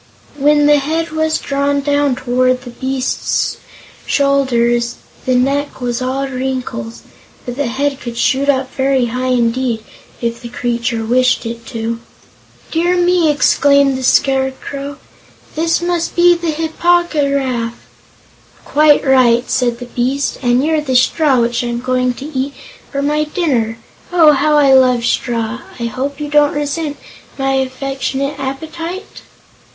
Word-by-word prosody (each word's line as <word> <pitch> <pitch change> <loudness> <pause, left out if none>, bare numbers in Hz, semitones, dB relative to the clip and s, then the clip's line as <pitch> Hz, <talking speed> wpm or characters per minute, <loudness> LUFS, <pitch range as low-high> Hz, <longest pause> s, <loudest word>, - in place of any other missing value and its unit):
When 295 +1 +3
the 295 0 +5
head 320 +4 -2
was 315 0 0
drawn 280 0 -1
down 285 -1 +1
toward 255 0 0
the 245 - -9
beast's 260 +1 -2 0.5
shoulders, 240 -4 +1 0.3
the 255 - +3
neck 275 +3 0
was 245 -1 -2
all 265 +2 -1
wrinkles, 255 - -4 0.4
but 245 - -5
the 285 -1 -1
head 275 +3 -1
could 235 -1 -6
shoot 270 +3 +1
up 265 -2 0
very 265 -1 +1
high 255 +1 -2
indeed, 240 -2 0 0.4
if 235 0 -3
the 240 - -8
creature 235 -1 -2
wished 255 +2 +2
it 230 0 -6
to. 230 -1 -4 0.7
"Dear 345 +2 +1
me!" 355 -2 +3
exclaimed 280 -2 +3
the 260 - -4
Scarecrow, 270 +2 0 0.6
"this 330 +2 0
must 345 -1 -1
be 350 0 +6
the 340 -1 -2
Hip 315 +1 -4
po 350 0 +4
gy 295 -5 -1
raf." 250 -4 -1 0.9
"Quite 295 0 +4
right," 255 -2 +4
said 240 -2 +1
the 245 - -8
beast; 255 +3 -2
"and 250 +2 +2
you're 315 -1 +1
the 265 -3 -2
straw 265 0 +3
which 235 +1 0
I'm 240 0 -3
to 255 +1 -1
eat 280 -2 -3 0.4
for 280 0 -2
my 300 +1 +1
dinner. 265 -9 -1 0.3
Oh, 330 -4 +6
how 300 +1 +2
I 280 -2 +5
love 250 -3 +4
straw! 235 0 -1 0.2
I - - -4
hope 270 +5 -4
you 300 - -3
don't 295 0 +3
resent 295 0 -2 0.4
my 270 -1 0
affectionate 270 +1 -2
appetite?" 320 +8 -6
270 Hz, 145 wpm, -16 LUFS, 245-295 Hz, 0.9 s, be